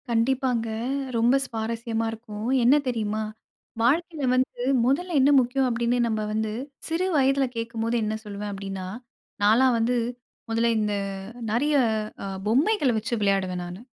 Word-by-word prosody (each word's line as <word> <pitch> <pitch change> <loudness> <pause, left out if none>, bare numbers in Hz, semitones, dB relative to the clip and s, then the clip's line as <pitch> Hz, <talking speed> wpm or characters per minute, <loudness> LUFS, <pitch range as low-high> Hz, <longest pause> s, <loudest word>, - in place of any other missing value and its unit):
கண்டிப்பாங்க. 240 0 +1 0.5
ரொம்ப 235 +3 +4
சுவாரஸ்யமா 230 -1 -3
இருக்கும். 220 -1 -7 0.2
என்ன 250 +4 +6
தெரியுமா? 220 -3 -1 0.6
வாழ்க்கையில 310 +5 +1
வந்து 255 -1 0 0.2
முதல்ல 330 +8 +1
என்ன 270 +2 +5
முக்கியம் 260 +1 +1
அப்பிடின்னு 240 0 0
நம்ம 220 -1 -1
வந்து 220 0 -1 0.4
சிறு 330 +3 0
வயதில 270 0 +3
கேட்கும்போது 230 0 -2
என்ன 215 0 -1
சொல்லுவேன் 205 0 -5
அப்பிடின்னா, 195 -1 -5 0.6
நான்லாம் 240 +4 +5
வந்து 230 +2 +1 0.5
முதல்ல 230 +1 +2
இந்த 210 -1 0 0.6
நெறைய 285 +7 +1 0.5
அ - - -4 0.2
பொம்மைகள 285 - +3
வச்சு 220 +2 -3
விளையாடுவேன் 190 -3 +1
நானு. 175 +2 -8
230 Hz, 130 wpm, -25 LUFS, 215-260 Hz, 0.6 s, என்ன